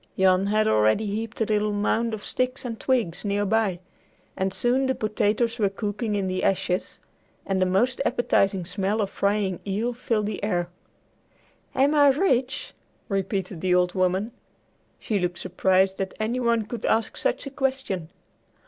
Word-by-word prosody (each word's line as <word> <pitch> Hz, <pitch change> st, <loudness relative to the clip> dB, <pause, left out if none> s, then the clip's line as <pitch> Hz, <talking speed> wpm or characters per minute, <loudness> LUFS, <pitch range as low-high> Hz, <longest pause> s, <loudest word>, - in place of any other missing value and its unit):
Jan 190 Hz, 0 st, +4 dB
had 215 Hz, +1 st, +2 dB
already 110 Hz, -, +3 dB
heaped 220 Hz, +3 st, -4 dB
a -, -, +3 dB
little 210 Hz, 0 st, +1 dB
mound 220 Hz, +2 st, 0 dB
of 210 Hz, -, -11 dB
sticks 255 Hz, +1 st, -2 dB
and 230 Hz, -2 st, -5 dB
twigs 235 Hz, -11 st, 0 dB
near 205 Hz, 0 st, 0 dB
by, 205 Hz, -3 st, +1 dB, 0.6 s
and 190 Hz, 0 st, -1 dB
soon 250 Hz, +6 st, +2 dB
the 260 Hz, -, +1 dB
potatoes 215 Hz, +2 st, 0 dB
were 205 Hz, -2 st, +3 dB
cooking 210 Hz, +2 st, -3 dB
in 200 Hz, -1 st, 0 dB
the 185 Hz, 0 st, -2 dB
ashes, 185 Hz, -1 st, 0 dB, 0.5 s
and 190 Hz, -1 st, 0 dB
a 185 Hz, -, +3 dB
most 240 Hz, +8 st, +1 dB
appetizing 195 Hz, -8 st, +1 dB
smell 200 Hz, +4 st, -1 dB
of 200 Hz, -2 st, -1 dB
frying 200 Hz, -2 st, 0 dB
eel 215 Hz, +5 st, -1 dB
filled 230 Hz, -3 st, -1 dB
the 205 Hz, -1 st, -4 dB
air. 175 Hz, -4 st, 0 dB, 1.1 s
"Am 275 Hz, +3 st, +3 dB
I 290 Hz, -1 st, +6 dB
rich?" 270 Hz, -2 st, +1 dB, 0.4 s
repeated 195 Hz, -3 st, -2 dB
the 185 Hz, -1 st, +2 dB
old 180 Hz, 0 st, +2 dB
woman. 185 Hz, +4 st, 0 dB, 0.7 s
She 210 Hz, -3 st, -1 dB
looked 175 Hz, -1 st, -2 dB
surprised 190 Hz, +1 st, +1 dB
that 190 Hz, -1 st, -3 dB
any 225 Hz, +4 st, -1 dB
one 235 Hz, -3 st, +1 dB
could 230 Hz, +1 st, -6 dB
ask 225 Hz, 0 st, +1 dB
such -, -, -1 dB
a 275 Hz, -, -6 dB
question. 260 Hz, -, -2 dB
210 Hz, 165 wpm, -25 LUFS, 190-235 Hz, 1.1 s, I